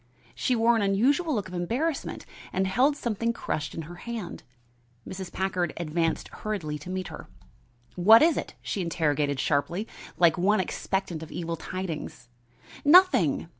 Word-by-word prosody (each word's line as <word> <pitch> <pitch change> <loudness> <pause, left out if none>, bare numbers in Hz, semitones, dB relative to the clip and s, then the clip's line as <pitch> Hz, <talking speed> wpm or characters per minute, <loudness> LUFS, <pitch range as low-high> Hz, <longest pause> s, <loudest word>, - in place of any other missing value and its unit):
She 255 - 0
wore 235 +1 +4
an 225 - +1
unusual 265 - +2
look 200 -4 -2
of 185 - -11
embarrassment 250 - -2 0.3
and 190 +1 0
held 255 +10 +2
something 230 -1 -1
crushed 155 -8 -4
in 165 - -4
her 175 +3 -10
hand. 225 -4 -6 0.7
Mrs. 190 -1 -6
Packard 185 -4 -1
advanced 165 0 -1
hurriedly 170 -9 -4
to 155 - -10
meet 185 0 -3
her. - - -9 0.7
"What 220 +8 +7
is 330 0 +4
it?" - - -5
she 200 - -2
interrogated 150 -5 0
sharply, 170 - 0 0.3
like 170 0 +4
one 205 +4 +3
expectant 185 -2 -2
of 160 - -9
evil 170 -1 -3
tidings. 165 -8 -6 0.5
"Nothing! 290 - +5
185 Hz, 150 wpm, -27 LUFS, 165-230 Hz, 0.7 s, What